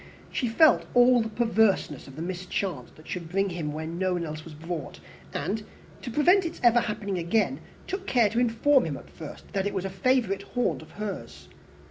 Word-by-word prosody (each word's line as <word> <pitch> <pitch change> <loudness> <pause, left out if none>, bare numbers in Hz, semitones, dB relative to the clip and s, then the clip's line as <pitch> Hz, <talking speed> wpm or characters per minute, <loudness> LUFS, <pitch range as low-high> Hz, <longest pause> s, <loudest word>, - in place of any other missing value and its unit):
She 250 - 0
felt 310 +8 +5
all 245 0 +6
the 225 - -2
perverseness 220 - +1
of 135 - -11
the 160 - -5
mischance 185 +1 -3
that 155 - -16
should 170 -3 -5
bring 195 +2 +1
him 165 -4 -3
where 155 +1 -4
no 180 +3 -1
one 175 -1 -1
else 155 0 -6
was 160 -2 -10
brought; 160 - -6 0.3
and, 195 - -2 0.4
to - - -5
prevent 350 - +4
its 335 -1 -5
ever 240 0 +6
happening 205 -4 -2
again, 175 +6 +1 0.3
took 385 0 -5
care 235 -5 +4
to 230 - +1
inform 245 +3 +3
him, 145 -3 -3
at - - -14
first, 160 +5 -10
that 195 0 0
it 205 - -4
was 190 0 -1
a 195 - -3
favourite 200 0 +1
haunt 245 +4 -1
of - - -13
hers. 75 - -7
195 Hz, 200 wpm, -27 LUFS, 165-235 Hz, 0.4 s, all